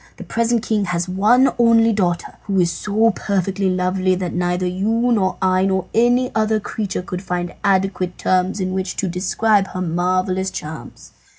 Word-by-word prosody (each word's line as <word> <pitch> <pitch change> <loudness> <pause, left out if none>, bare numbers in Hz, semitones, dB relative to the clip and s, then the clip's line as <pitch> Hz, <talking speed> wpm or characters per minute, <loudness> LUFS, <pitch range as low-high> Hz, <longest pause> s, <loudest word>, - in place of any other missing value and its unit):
The - - -8
present 230 0 0
king 210 -2 0
has 175 -1 -2
one 215 +8 +3
only 230 -1 +4
daughter, 175 -4 -1
who 195 -2 0
is 170 -1 +2
so 215 +6 +1
perfectly 195 -1 -1
lovely 185 0 +1
that 180 -2 -4
neither 180 0 -1
you, 220 +7 0
nor 190 -5 +1
I, 185 0 +2
nor 190 -1 0
any 245 +2 +2
other 215 0 +1
creature 200 -3 -4
could 180 -1 -5
find 175 -2 -3
adequate 190 -2 0
terms 185 +2 0
in 185 -1 -2
which 190 0 -3
to 195 - -2
describe 195 +3 +1
her 185 - -6
marvellous 185 +2 0
charms. 155 -3 -9
190 Hz, 170 wpm, -19 LUFS, 180-215 Hz, -, only